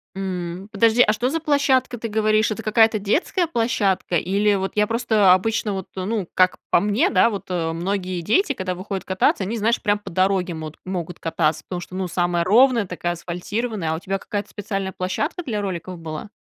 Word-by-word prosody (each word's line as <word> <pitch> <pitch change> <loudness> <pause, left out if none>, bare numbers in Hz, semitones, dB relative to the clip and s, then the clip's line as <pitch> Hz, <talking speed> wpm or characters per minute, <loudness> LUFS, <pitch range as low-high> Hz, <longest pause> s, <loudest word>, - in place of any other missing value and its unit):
М, 185 -1 -4
подожди, 230 +3 +4
а 215 - +3
что 240 +4 0
за 325 +4 -1
площадка, 280 -5 +2
ты 230 - -4
говоришь? 215 0 +2
Это 225 +1 -4
какая-то 220 +1 +4
детская 320 - 0
площадка? 220 - 0
Или 200 +5 +2
вот 190 0 -2
я 210 0 +3
просто 220 -5 +4
обычно, 210 +2 0
вот, 190 -2 -5
ну, 195 0 -2
как 185 0 +3
по - - +6
мне, 210 - +2
да, 235 - +4
вот 200 -4 -6
многие 180 +2 -2
дети, 370 - +2
когда 185 -1 -3
выходят 190 +1 -5
кататься, 190 +1 +1
они, 215 +5 -3
знаешь, 225 +2 +1
прям 205 -1 +1
по 205 - -9
дороге 185 0 +1
мот 155 -1 -7
могут 180 -2 -5
кататься. 165 -1 0
Потому 180 - -4
что, 180 - -9
ну, 185 -1 -2
самая 175 0 0
ровная, 235 +4 +4
такая 175 -1 -3
асфальтированная. 180 +2 -3
А - - 0
у - - -5
тебя 195 +2 -2
какая-то 205 0 -5
специальная 195 -2 -4
площадка 190 - -3
для 220 -8 -2
роликов 185 -2 -5
была? 160 +4 -6
195 Hz, 195 wpm, -22 LUFS, 180-220 Hz, -, по